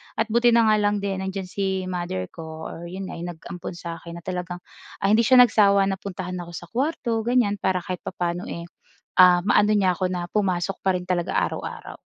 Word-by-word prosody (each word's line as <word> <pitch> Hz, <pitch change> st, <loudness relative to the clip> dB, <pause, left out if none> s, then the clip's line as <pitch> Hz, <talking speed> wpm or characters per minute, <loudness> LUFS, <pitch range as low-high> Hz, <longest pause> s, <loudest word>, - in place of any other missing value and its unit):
At 225 Hz, 0 st, -1 dB
buti 235 Hz, 0 st, +4 dB
na 230 Hz, -, +6 dB
nga -, -, +5 dB
lang 205 Hz, -1 st, +1 dB
din 195 Hz, -1 st, -2 dB
nandiyan 190 Hz, -1 st, -4 dB
si 190 Hz, 0 st, -2 dB
mother 175 Hz, -, -3 dB
ko 160 Hz, -1 st, -8 dB
or 165 Hz, -, -9 dB
yun 190 Hz, +2 st, -6 dB
nga -, -, -7 dB
yung 175 Hz, +1 st, -4 dB
nag-ampon 175 Hz, +2 st, -8 dB
sa 170 Hz, -1 st, -6 dB
akin, 170 Hz, 0 st, -9 dB
na -, -, -18 dB
talagang 180 Hz, -1 st, -5 dB, 0.4 s
ah, -, -, +3 dB
hindi 225 Hz, +1 st, +4 dB
siya 255 Hz, -1 st, +9 dB
nagsawa 200 Hz, -4 st, +4 dB
na 195 Hz, -, -4 dB
puntahan 185 Hz, -2 st, -5 dB
ako 175 Hz, 0 st, -8 dB
sa 175 Hz, -, -8 dB
kuwarto 250 Hz, -3 st, -1 dB
ganyan, 240 Hz, -5 st, +3 dB
para 185 Hz, -1 st, +1 dB
kahit 180 Hz, 0 st, -6 dB
papaano 175 Hz, -1 st, -3 dB
eh, 170 Hz, 0 st, -6 dB, 0.5 s
ah, 180 Hz, -1 st, +7 dB
ma-ano 210 Hz, +2 st, +4 dB
niya 185 Hz, -4 st, +2 dB
ako 185 Hz, -, +1 dB
na 175 Hz, -1 st, -3 dB
pumasok 195 Hz, -2 st, 0 dB
pa 190 Hz, -, +4 dB
rin 180 Hz, -, -2 dB
talaga 175 Hz, -2 st, 0 dB
araw-araw. -, -, -3 dB
185 Hz, 215 wpm, -24 LUFS, 175-205 Hz, 0.5 s, siya